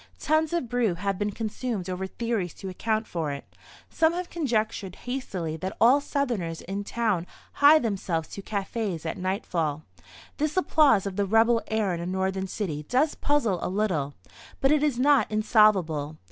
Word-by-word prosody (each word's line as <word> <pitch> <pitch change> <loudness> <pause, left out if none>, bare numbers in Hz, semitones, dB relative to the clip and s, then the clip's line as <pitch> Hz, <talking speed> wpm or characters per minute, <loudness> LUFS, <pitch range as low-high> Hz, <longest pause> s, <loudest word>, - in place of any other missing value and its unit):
Tons 310 0 +1
of 340 -7 -1
brew 230 -6 +1
have 195 +2 -2
been 205 0 0
consumed 215 -1 -4
over 185 +1 -3
theories 225 -5 -3
to 195 - -7
account 220 +4 -1
for 160 -7 -3
it. 140 - -6 0.4
Some 320 0 +2
have 355 0 -4
conjectured 220 - -1
hastily 190 -11 -3
that 185 +4 -5
all 260 +5 +6
Southerners 235 - -2
in 195 +2 -4
town 205 -5 -1 0.3
hie 290 +2 +9
themselves 190 - -1
to 200 - -7
cafés 200 -4 -3
at 160 - -3
nightfall. 175 -5 -2 0.5
This 305 +3 -1
applause 290 - +4
of 195 -1 -4
the 200 - +2
"rebel" 225 +2 +4
air 215 -4 0
in 170 - -3
a 170 - -4
Northern 190 +1 -1
city 175 -7 -3
does 285 +5 +2
puzzle 235 -11 0
a - - -2
little; 180 -8 -1 0.4
but 270 - +3
it 300 -1 +4
is 295 -5 +1
not 280 +2 +4
insolvable. 190 -9 +2
210 Hz, 170 wpm, -26 LUFS, 180-245 Hz, 0.5 s, hie